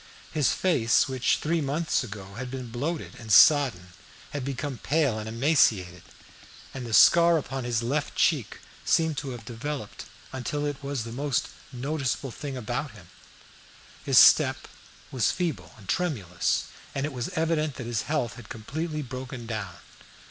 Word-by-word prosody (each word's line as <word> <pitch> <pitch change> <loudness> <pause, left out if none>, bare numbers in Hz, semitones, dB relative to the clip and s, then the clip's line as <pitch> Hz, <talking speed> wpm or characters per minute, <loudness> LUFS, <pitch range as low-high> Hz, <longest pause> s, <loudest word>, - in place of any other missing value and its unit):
His 150 -5 +2
face, 130 -12 +2
which 130 -2 +1
three 165 +2 0
months 150 +3 0
ago 100 -4 -9
had 125 +4 -6
been 125 -2 -6
bloated 150 +7 -3
and 110 -2 -7
sodden, 125 - +6 0.4
had 145 -2 -4
become 140 0 -4
pale 140 -7 +1
and 110 +1 -5
emaciated, 110 - +2 0.7
and 130 -2 -6
the - - -7
scar 170 +7 +7
upon 135 -4 -4
his 120 -1 0
left 140 +5 -2
cheek 140 -10 +1 0.2
seemed 160 -2 +2
to 140 - -6
have 120 -3 -8
developed 125 0 -6 0.3
until 145 +3 -3
it 145 -1 -3
was 140 -4 -3
the 115 - -7
most 140 +3 -1 0.2
noticeable 135 0 -2
thing 140 +1 -6
about 120 +5 -3
him. 95 -6 -15 0.9
His - - +2
step - - +6 0.4
was 125 -5 +2
feeble 170 -8 -3
and 100 -3 -15
tremulous, 105 - 0 0.3
and 135 - 0
it 155 - -5
was 125 +2 -3
evident 160 -3 0
that 125 - -6
his 115 -2 -1
health 145 -5 -2
had 120 -3 -12
completely 150 +7 -4
broken 130 -1 -7
down. 105 -6 -5
130 Hz, 155 wpm, -27 LUFS, 115-150 Hz, 0.9 s, scar